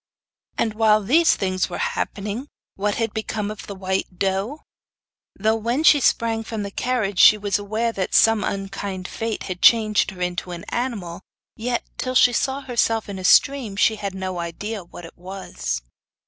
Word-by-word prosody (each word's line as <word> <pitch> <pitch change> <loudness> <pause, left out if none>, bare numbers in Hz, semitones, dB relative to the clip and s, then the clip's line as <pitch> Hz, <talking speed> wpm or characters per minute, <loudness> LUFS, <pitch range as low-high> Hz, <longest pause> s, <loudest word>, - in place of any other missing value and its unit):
And 220 -2 0
while 215 -1 +3
these 315 +10 +4
things 185 -1 -1
were 175 - -5 0.2
happening, 210 +7 -4 0.3
what 205 +1 -1
had 225 -2 -2
become 215 -1 -3
of 215 - -9
the 200 - -6
white 190 -1 -3
doe? 195 - -2 0.7
Though 220 +3 +1
when 235 +7 -1
she 300 -2 +7
sprang 230 -3 +1
from 220 -2 -4
the 200 - -5
carriage 215 -5 -1
she 215 - +8
was 205 -1 -1
aware 220 +3 -1
that 190 -4 -2
some 225 -2 +5
unkind 195 -1 -4
fate 225 -1 -4
had 180 -2 -6
changed 215 -3 +5
her 185 -1 -10
into 180 0 -3
an 170 - -7
animal, 200 -9 -3 0.3
yet, 240 +2 -2 0.2
till 255 0 -2
she 245 -1 +6
saw 270 +3 0
herself 230 -4 0
in 195 -1 -5
a - - -7
stream, 255 +1 +4
she 215 +2 +3
had 200 -2 -4
no 185 -1 -4
idea 195 +5 -5
what 175 0 -11
it 165 - -13
was. 180 - -5
210 Hz, 175 wpm, -22 LUFS, 190-230 Hz, 0.7 s, she